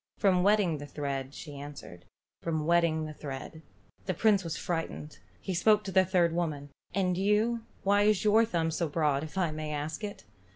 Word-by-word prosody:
"From 185 Hz, -3 st, +3 dB
wetting 195 Hz, -5 st, +3 dB
the 145 Hz, -, -7 dB
thread," 140 Hz, -2 st, -4 dB
she 145 Hz, -3 st, -8 dB
answered. 140 Hz, -12 st, -10 dB, 0.4 s
"From 160 Hz, -2 st, -1 dB
wetting 170 Hz, -2 st, +2 dB
the 155 Hz, -, -6 dB
thread." 145 Hz, +2 st, -7 dB, 0.5 s
The 185 Hz, -, 0 dB
Prince 200 Hz, +1 st, +3 dB
was 165 Hz, -1 st, -4 dB
frightened. 165 Hz, -3 st, -4 dB, 0.2 s
He 190 Hz, -, -3 dB
spoke 210 Hz, +4 st, +4 dB
to 195 Hz, -, -5 dB
the 190 Hz, 0 st, +4 dB
third 175 Hz, -2 st, +2 dB
old 165 Hz, -, -3 dB
woman. 145 Hz, -5 st, -2 dB, 0.2 s
"And 180 Hz, -1 st, +1 dB
you, 220 Hz, +4 st, +1 dB, 0.2 s
why 200 Hz, +1 st, +4 dB
is 210 Hz, -1 st, +3 dB
your 215 Hz, +2 st, +5 dB
thumb 170 Hz, -7 st, 0 dB
so 160 Hz, 0 st, -1 dB
broad, 145 Hz, -2 st, +1 dB
if 160 Hz, +4 st, -8 dB
I 175 Hz, -4 st, +1 dB
may 155 Hz, 0 st, -4 dB
ask 150 Hz, +6 st, -4 dB
it?" 205 Hz, -1 st, -6 dB
170 Hz, 195 wpm, -30 LUFS, 150-195 Hz, 0.5 s, your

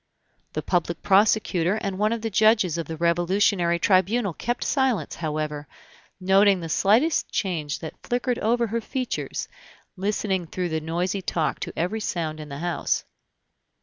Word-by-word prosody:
The -, -, -3 dB
public 170 Hz, -2 st, -1 dB
prosecutor 195 Hz, -2 st, +3 dB
and 200 Hz, -3 st, -3 dB
one 210 Hz, +1 st, +2 dB
of 230 Hz, -1 st, -2 dB
the 225 Hz, -, -2 dB
judges 215 Hz, -4 st, +4 dB
of 165 Hz, -, -4 dB
the 160 Hz, -, -5 dB
Revolutionary 175 Hz, +1 st, +2 dB
Tribunal 195 Hz, +3 st, +2 dB
kept 240 Hz, +9 st, -2 dB
silence, 265 Hz, -5 st, 0 dB
however; 150 Hz, -2 st, -3 dB, 0.5 s
noting 195 Hz, +1 st, +4 dB
the 165 Hz, -1 st, -6 dB
slightest 230 Hz, -, +3 dB
change 160 Hz, -6 st, -2 dB
that 160 Hz, -, -8 dB
flickered 245 Hz, 0 st, -1 dB
over 235 Hz, +2 st, +2 dB
her 230 Hz, +1 st, -2 dB
features, 255 Hz, +3 st, -3 dB, 0.5 s
listening 190 Hz, -2 st, -1 dB
through 180 Hz, +1 st, -3 dB
the 160 Hz, -1 st, -2 dB
noisy 175 Hz, +5 st, -2 dB
talk 165 Hz, -3 st, -1 dB
to -, -, -5 dB
every 180 Hz, +7 st, -1 dB
sound 160 Hz, -6 st, -3 dB
in 150 Hz, -1 st, -8 dB
the 140 Hz, -, -6 dB
house. 175 Hz, +2 st, -1 dB
190 Hz, 150 wpm, -25 LUFS, 170-215 Hz, 0.5 s, judges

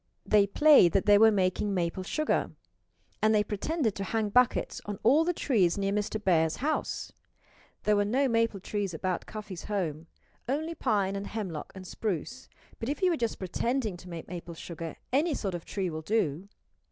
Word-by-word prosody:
They 205 Hz, -1 st, +4 dB
played 280 Hz, -, +6 dB
that 195 Hz, -, +2 dB
they 205 Hz, -1 st, +6 dB
were 225 Hz, +1 st, +8 dB
making 195 Hz, 0 st, 0 dB
maple 175 Hz, +1 st, -1 dB
sugar. 305 Hz, +11 st, 0 dB, 0.7 s
And 215 Hz, 0 st, +4 dB
they 210 Hz, -, +4 dB
pretended 220 Hz, -, -1 dB
to 195 Hz, -, -3 dB
hang 215 Hz, +1 st, -1 dB
buckets 250 Hz, +3 st, +2 dB
on 205 Hz, -1 st, -4 dB
all 280 Hz, +8 st, +5 dB
the 350 Hz, -, +1 dB
trees 210 Hz, -, +1 dB
near 195 Hz, 0 st, 0 dB
Mr. 210 Hz, +1 st, -1 dB
Bear's 160 Hz, -5 st, +2 dB
house. 305 Hz, +4 st, -2 dB, 0.7 s
There 210 Hz, -, +3 dB
were 205 Hz, -, +3 dB
no 255 Hz, +7 st, +1 dB
maple 230 Hz, -4 st, +1 dB
trees 195 Hz, -2 st, -3 dB
about 185 Hz, +2 st, -2 dB
Cuffy's 210 Hz, -4 st, -7 dB
home 165 Hz, -6 st, -3 dB, 0.4 s
only 315 Hz, +5 st, -1 dB
pine 205 Hz, -10 st, 0 dB
and 200 Hz, 0 st, -4 dB
hemlock 190 Hz, -8 st, -5 dB
and 190 Hz, -1 st, -9 dB
spruce 220 Hz, -, -4 dB, 0.3 s
but 230 Hz, -, -3 dB
if 290 Hz, +5 st, -3 dB
you 365 Hz, -2 st, +4 dB
are -, -, +1 dB
just 230 Hz, -5 st, -2 dB
pretending 220 Hz, +3 st, -1 dB
to 180 Hz, +1 st, -12 dB
make 170 Hz, -2 st, -7 dB
maple 175 Hz, -1 st, -7 dB
sugar 165 Hz, 0 st, -7 dB, 0.2 s
any 300 Hz, +3 st, +2 dB
sort 195 Hz, -6 st, -3 dB
of 175 Hz, -2 st, -6 dB
tree 190 Hz, -4 st, -2 dB
will 155 Hz, 0 st, -5 dB
do. 185 Hz, -2 st, -1 dB
205 Hz, 185 wpm, -29 LUFS, 185-230 Hz, 0.7 s, were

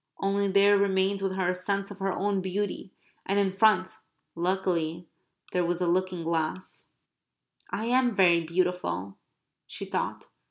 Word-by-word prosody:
Only 200 Hz, +1 st, 0 dB
there 200 Hz, +1 st, +5 dB
remained 195 Hz, 0 st, +1 dB
with 195 Hz, -1 st, -1 dB
her 185 Hz, -1 st, 0 dB
a -, -, +2 dB
sense 195 Hz, +2 st, -2 dB
of 200 Hz, -, -10 dB
her 195 Hz, 0 st, 0 dB
own 195 Hz, +1 st, 0 dB
beauty, 190 Hz, 0 st, -3 dB, 0.3 s
and 195 Hz, -, 0 dB
in 195 Hz, -2 st, +2 dB
front, 200 Hz, -2 st, +3 dB, 0.3 s
luckily, 170 Hz, -2 st, -1 dB, 0.4 s
there 180 Hz, -, +1 dB
was 175 Hz, 0 st, -1 dB
a 180 Hz, -, 0 dB
looking 180 Hz, 0 st, 0 dB
glass. 165 Hz, +2 st, -2 dB, 0.8 s
"I 220 Hz, -, -3 dB
am 245 Hz, -1 st, +2 dB
very 175 Hz, -3 st, +5 dB
beautiful," 170 Hz, -, -2 dB, 0.5 s
she -, -, -6 dB
thought. -, -, -3 dB
190 Hz, 150 wpm, -28 LUFS, 180-200 Hz, 0.8 s, there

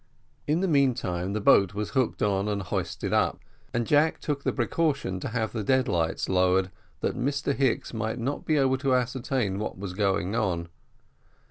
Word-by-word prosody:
In 155 Hz, +4 st, +2 dB
the 190 Hz, -, +1 dB
meantime 115 Hz, -, +1 dB
the 110 Hz, -, -1 dB
boat 100 Hz, -2 st, +4 dB
was 105 Hz, 0 st, -3 dB
hooked 130 Hz, -3 st, 0 dB
on 100 Hz, -1 st, +1 dB
and 100 Hz, -2 st, -1 dB
hoisted -, -, -3 dB
up, -, -, +2 dB, 0.3 s
and 120 Hz, 0 st, -1 dB
Jack 150 Hz, +4 st, +3 dB
took 145 Hz, -2 st, -3 dB
the -, -, +1 dB
precaution 135 Hz, -, -1 dB
to -, -, -4 dB
have 110 Hz, -1 st, -2 dB
the 110 Hz, -3 st, -2 dB
dead 130 Hz, +4 st, +2 dB
lights 80 Hz, -2 st, 0 dB
lowered 95 Hz, 0 st, +2 dB, 0.3 s
that -, -, -1 dB
Mr 140 Hz, +3 st, -1 dB
Hicks 130 Hz, -3 st, 0 dB
might 110 Hz, +1 st, -2 dB
not 130 Hz, +4 st, -3 dB
be 155 Hz, -, +1 dB
able 130 Hz, -1 st, +2 dB
to 135 Hz, -1 st, +2 dB
ascertain 125 Hz, -5 st, -1 dB
what 105 Hz, -, -4 dB
was 95 Hz, -1 st, -5 dB
going 95 Hz, 0 st, 0 dB
on. 85 Hz, -6 st, -1 dB
115 Hz, 180 wpm, -27 LUFS, 95-135 Hz, 0.3 s, boat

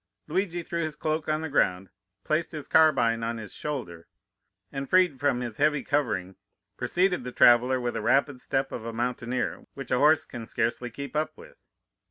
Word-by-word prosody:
"Luigi 175 Hz, +1 st, -1 dB
threw 170 Hz, 0 st, -3 dB
his 155 Hz, -2 st, -3 dB
cloak 155 Hz, +1 st, -2 dB
on 155 Hz, 0 st, 0 dB
the 160 Hz, -, -3 dB
ground, 95 Hz, -10 st, +1 dB, 0.3 s
placed 160 Hz, +2 st, -1 dB
his 150 Hz, -2 st, -6 dB
carbine 130 Hz, -8 st, +4 dB
on 115 Hz, +1 st, -2 dB
his 105 Hz, -3 st, -8 dB
shoulder, 105 Hz, -, -5 dB, 0.6 s
and 135 Hz, -1 st, -5 dB
freed 180 Hz, -7 st, +3 dB
from 140 Hz, -3 st, +1 dB
his 120 Hz, -3 st, -5 dB
heavy 150 Hz, -2 st, +2 dB
covering, 110 Hz, -10 st, -1 dB, 0.4 s
preceded 180 Hz, -3 st, +1 dB
the 125 Hz, -, -5 dB
traveller 125 Hz, +2 st, +5 dB
with 120 Hz, -1 st, -2 dB
the -, -, -3 dB
rapid 135 Hz, +3 st, +1 dB
step 135 Hz, 0 st, -1 dB
of 115 Hz, -, -5 dB
a 115 Hz, -, -4 dB
mountaineer, 120 Hz, +1 st, -2 dB
which 135 Hz, -1 st, -8 dB
a 125 Hz, -, +3 dB
horse 150 Hz, +1 st, +5 dB
can 115 Hz, -3 st, -8 dB
scarcely 120 Hz, +2 st, -1 dB
keep 140 Hz, +5 st, -8 dB
up 155 Hz, +1 st, -1 dB
with. -, -, -17 dB
135 Hz, 185 wpm, -27 LUFS, 120-155 Hz, 0.6 s, traveller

